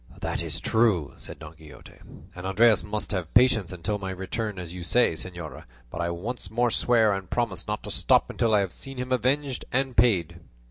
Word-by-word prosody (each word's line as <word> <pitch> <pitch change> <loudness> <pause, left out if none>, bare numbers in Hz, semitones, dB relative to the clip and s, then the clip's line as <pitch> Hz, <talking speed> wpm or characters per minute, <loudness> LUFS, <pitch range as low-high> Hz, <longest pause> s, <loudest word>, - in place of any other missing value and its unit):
"That - - -2
is - - -3
true," 110 - +2
said - - -9
Don 80 -1 -10
Quixote, 80 -2 -14 0.4
"and 90 +1 -6
Andres 105 +1 +4
must 105 0 -3
have 90 -6 -3
patience 115 -7 +4
until 95 +4 -3
my 95 -1 -4
return 95 +3 -4
as 90 -2 -7
you 90 -1 -7
say, 120 +4 +3
señora; 85 -1 -6 0.3
but - - -4
I 85 - 0
once 105 +9 -4
more 120 +2 +1
swear 115 -4 +3
and 95 -2 -5
promise 105 -7 -1
not 105 0 -3
to - - -6
stop - - +3
until 115 -2 +2
I 100 - +4
have 95 -4 -3
seen 135 -1 -6
him 125 +1 -4
avenged 130 +2 0
and 135 0 0
paid." 105 -9 +2
105 Hz, 200 wpm, -26 LUFS, 90-120 Hz, 0.4 s, Andres